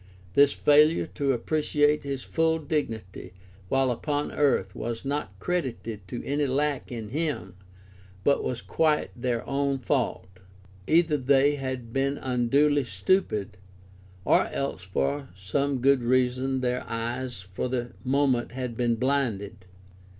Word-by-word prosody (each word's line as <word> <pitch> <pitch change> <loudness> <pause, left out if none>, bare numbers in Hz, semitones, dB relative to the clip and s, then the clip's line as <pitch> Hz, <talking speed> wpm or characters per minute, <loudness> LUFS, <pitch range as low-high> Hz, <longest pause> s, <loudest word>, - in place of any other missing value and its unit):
This 140 +3 +6
failure 150 +3 +4
to 140 -2 +1
appreciate 150 +3 +1
his 140 -2 -4
full 160 0 +1
dignity 115 - -4 0.4
while 135 -1 +2
upon 145 +5 -2
earth 120 -10 +1
was 115 +4 -5
not 135 -9 -3
credited 115 - -3
to 120 - -6
any 145 +1 0
lack 140 +1 -1
in 115 -3 -5
him, 145 - -3 0.7
but 140 - +3
was 120 -2 -3
quite 155 -2 +1
their 120 -1 -2
own 140 0 0
fault. 115 -6 -1 0.6
Either 160 -1 +4
they 140 +2 +4
had 130 -4 -5
been 140 +1 0
unduly 135 +3 +2
stupid, 105 - 0 0.7
or - - +4
else - - -3
for 135 - -2
some 130 +8 -1
good 135 0 +4
reason 130 +2 +1
their 125 0 -1
eyes 120 0 -3
for 95 +5 -4
the 120 -1 -2
moment 130 -2 +1
had 125 -2 -4
been 120 0 +1
blinded. 110 -6 -1
130 Hz, 130 wpm, -27 LUFS, 120-145 Hz, 0.7 s, This